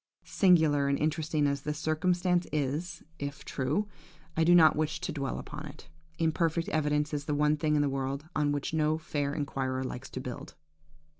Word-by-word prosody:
Singular 160 -7 +4
and 140 0 +2
interesting 155 0 0
as 140 -1 0
this 150 +1 -3
circumstance 175 +3 +1
is, 150 +4 -2 0.2
if 140 0 -5
true, 150 +10 -1 0.5
I 160 - +3
do 175 +2 +6
not 160 -2 +7
wish 155 0 -1
to - - -3
dwell 140 -3 -3
upon 150 +1 -7
it. 145 +1 -13 0.3
Imperfect 165 0 +1
evidence 150 -1 0
is 145 -1 -2
the 150 - -1
one 150 +1 +3
thing 150 0 +1
in 145 - +3
the - - +1
world 135 +2 -3
on 145 -1 +2
which 145 +2 -2
no 155 0 +2
fair 145 -3 -2
inquirer 130 -3 -2
likes 130 0 -6
to - - -6
build. - - -7
150 Hz, 180 wpm, -30 LUFS, 140-160 Hz, 0.5 s, not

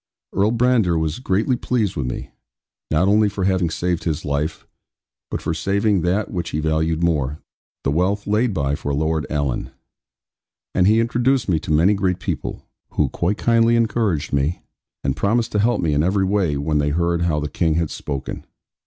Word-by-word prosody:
Earl 100 +3 +2
Brandir 115 -8 +3
was 80 +2 -1
greatly 115 +2 +1
pleased 115 -5 -1
with 70 -4 -2
me, - - -5 0.6
not 80 +5 +2
only 105 +1 +4
for 100 -1 -4
having 95 -3 +2
saved 85 +1 -1
his 80 -3 -2
life, 75 +2 -2 0.6
but - - -4
for - - -1
saving 100 -1 +1
that 95 +5 0
which 85 -3 -3
he 75 - -2
valued 80 +1 0
more, 75 -4 0 0.5
the 70 - +1
wealth 95 +6 0
laid 110 +4 +1
by 70 -6 -1
for 70 0 -2
Lord 80 +1 0
Alan. 70 -4 -1 1.0
And 90 0 +3
he 110 +2 +5
introduced 120 +1 +1
me 85 -5 +2
to 80 - -5
many 85 +7 +4
great 95 -3 0
people, - - -4 0.3
who - - +1
quite 95 +5 -1
kindly 115 0 +3
encouraged 110 -10 0
me, 70 +5 0 0.4
and 70 -1 0
promised 115 - +1
to 105 - 0
help 115 +2 +2
me 80 -3 +1
in 75 - +2
every 95 +3 +2
way 95 -7 +1
when 75 +1 0
they 75 0 +1
heard 85 +2 0
how 80 -3 +1
the 75 - -2
King 80 +2 0
had 85 -2 0
spoken. 70 -3 -5
90 Hz, 185 wpm, -21 LUFS, 75-105 Hz, 1.0 s, he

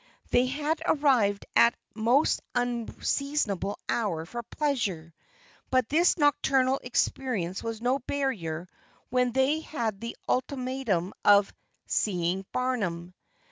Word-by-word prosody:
They 245 +1 +4
had 300 +4 -1
arrived 245 -9 +3
at 235 - +6 0.2
a - - -10
most 245 +7 +3
unseasonable 245 -2 -1
hour 180 -9 -1
for 240 +7 -5
pleasure, 215 - -2 0.6
but 255 -3 +2
this 340 +6 +3
nocturnal 270 -3 +3
experience 230 -7 -1
was 230 -1 -5
no 255 +3 +2
barrier 200 - -3 0.4
when 250 -1 +2
they 265 +5 +2
had 230 -10 -3
the 230 0 -6
ultimatum 255 -8 -1
of 205 -1 +5 0.3
"seeing 185 -1 0
Barnum." 190 -9 -2
245 Hz, 110 wpm, -28 LUFS, 200-270 Hz, 0.6 s, at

